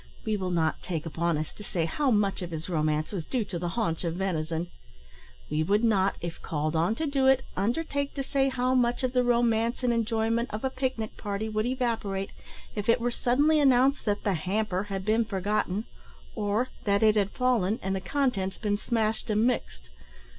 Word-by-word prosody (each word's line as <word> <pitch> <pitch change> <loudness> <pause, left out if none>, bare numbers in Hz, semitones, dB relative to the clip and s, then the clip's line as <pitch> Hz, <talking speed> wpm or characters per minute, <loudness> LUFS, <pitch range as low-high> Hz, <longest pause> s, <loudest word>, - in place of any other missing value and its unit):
We 215 - +1
will 190 -3 -2
not 165 -3 0
take 165 -4 -4
upon 165 0 0
us 155 0 -4
to 210 - -10
say 170 -4 -1
how 275 - 0
much 205 -4 +2
of 175 - -4
his 160 -1 -5
romance 155 -3 0
was 190 -6 -3
due 240 +5 -1
to 180 -3 -5
the 175 - -2
haunch 165 -8 0
of 165 -1 -1
venison. 170 -3 -1 0.9
We 155 - +1
would 205 +7 +2
not, 200 -4 +3
if 170 -1 -5
called 155 0 -2
on 170 +7 +2
to 320 - -2
do 275 -2 +2
it, 265 0 +5
undertake 280 - -1
to 275 - -2
say 270 0 +1
how 255 0 0
much 245 0 +2
of 255 -1 0
the 250 -1 +3
romance 235 0 +2
and 245 -1 +3
enjoyment 230 +1 0
of 215 +3 -5
a 265 - 0
pic 260 -1 -1
nic 220 -1 -5
party 205 +1 -3
would 215 +1 0
evaporate, 225 -6 -1 0.4
if 210 +1 -3
it 230 - +5
were 240 +1 0
suddenly 290 +7 +3
announced 270 0 +4
that 205 -1 0
"the 200 - +1
hamper" 190 +3 -1
had 195 -2 -4
been 220 +2 +3
forgotten, 205 0 -1 0.5
or 215 +4 0 0.2
that 200 0 +2
it 215 -1 +6
had 200 -2 +2
fallen 230 -4 +1
and 195 +1 -1
the 190 - -3
contents 215 -8 0
been 205 -2 -1
smashed 225 -1 -1
and 215 +1 +3
mixed. 65 - -1
215 Hz, 205 wpm, -28 LUFS, 185-245 Hz, 0.9 s, it